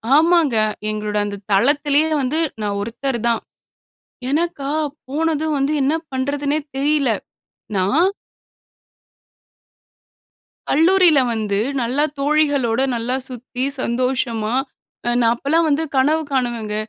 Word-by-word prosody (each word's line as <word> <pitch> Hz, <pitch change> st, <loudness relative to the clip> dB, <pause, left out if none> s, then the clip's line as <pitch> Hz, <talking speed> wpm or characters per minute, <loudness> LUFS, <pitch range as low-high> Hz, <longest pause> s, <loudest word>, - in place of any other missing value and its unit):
ஆமாங்க. 320 Hz, -5 st, +4 dB, 0.3 s
எங்களோட 210 Hz, 0 st, -2 dB
அந்த 205 Hz, -1 st, -5 dB
தளத்திலயே 290 Hz, +8 st, +3 dB
வந்து 270 Hz, +5 st, 0 dB, 0.2 s
நான் 205 Hz, -1 st, -2 dB
ஒருத்தர் 235 Hz, +3 st, -3 dB
தான். 230 Hz, -1 st, +1 dB, 0.9 s
எனக்கா 290 Hz, -2 st, -1 dB, 0.4 s
போனதும் 315 Hz, +1 st, 0 dB
வந்து, 275 Hz, +2 st, +1 dB
என்ன 280 Hz, +4 st, +2 dB, 0.2 s
பண்றதுன்னே 285 Hz, +3 st, -1 dB, 0.2 s
தெரியல. 285 Hz, -1 st, +2 dB, 0.7 s
நான் 260 Hz, -, +3 dB, 2.6 s
கல்லூரியில 335 Hz, 0 st, +5 dB
வந்து 210 Hz, -3 st, -1 dB, 0.2 s
நல்லா 255 Hz, +5 st, 0 dB, 0.2 s
தோழிகளோட 285 Hz, -5 st, +2 dB, 0.2 s
நல்லா 235 Hz, +2 st, -1 dB
சுத்தி 250 Hz, 0 st, -5 dB, 0.2 s
சந்தோஷமா, 235 Hz, -3 st, -1 dB, 0.5 s
நான் 240 Hz, 0 st, +2 dB
அப்பலாம் 315 Hz, +7 st, +1 dB
வந்து 295 Hz, +2 st, +1 dB
கனவு 305 Hz, +4 st, +3 dB
காணுவேங்க. 235 Hz, -5 st, -1 dB
275 Hz, 95 wpm, -20 LUFS, 235-305 Hz, 2.6 s, கல்லூரியில